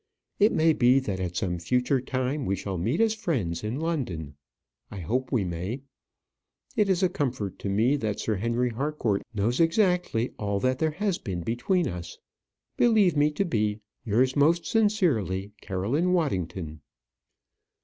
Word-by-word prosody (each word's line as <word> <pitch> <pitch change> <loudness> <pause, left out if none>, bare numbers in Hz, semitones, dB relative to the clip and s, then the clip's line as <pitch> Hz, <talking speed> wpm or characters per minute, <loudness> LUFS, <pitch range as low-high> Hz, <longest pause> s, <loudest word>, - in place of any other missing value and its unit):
It 210 +2 +5
may 160 0 +3
be 125 -1 +4
that 100 -8 -1
at 90 -1 -3
some 90 -2 -1
future 125 - +1
time 130 +2 -2
we 95 - +1
shall 95 0 -4
meet 115 - 0
as 225 -1 +3
friends 130 - -2
in 110 +6 -3
London. 120 - -3 0.6
I 100 - -8
hope 125 +9 -2
we 120 -6 +2
may. 90 +9 -4 0.9
It 210 -2 +2
is 190 0 +2
a - - +6
comfort 125 - -3
to 100 - -3
me 115 +8 +2
that 110 -6 -2
Sir 110 -2 -1
Henry 120 +4 0
Harcourt 120 -5 -1
knows 110 +3 0
exactly 170 - +2
all 100 -1 -1
that 130 0 +1
there 160 - +2
has 200 -3 0
been 90 -6 -4
between 140 - 0
us. 85 -1 -6 0.6
Believe 215 -8 +4
me 145 +1 +4
to 150 +6 -1
be, 105 - 0 0.2
Yours 125 +5 +2
most 160 +4 +3
sincerely, 140 - +1
CAROLINE 120 - 0
WADDINGTON. 90 - -2
125 Hz, 160 wpm, -27 LUFS, 100-160 Hz, 0.9 s, a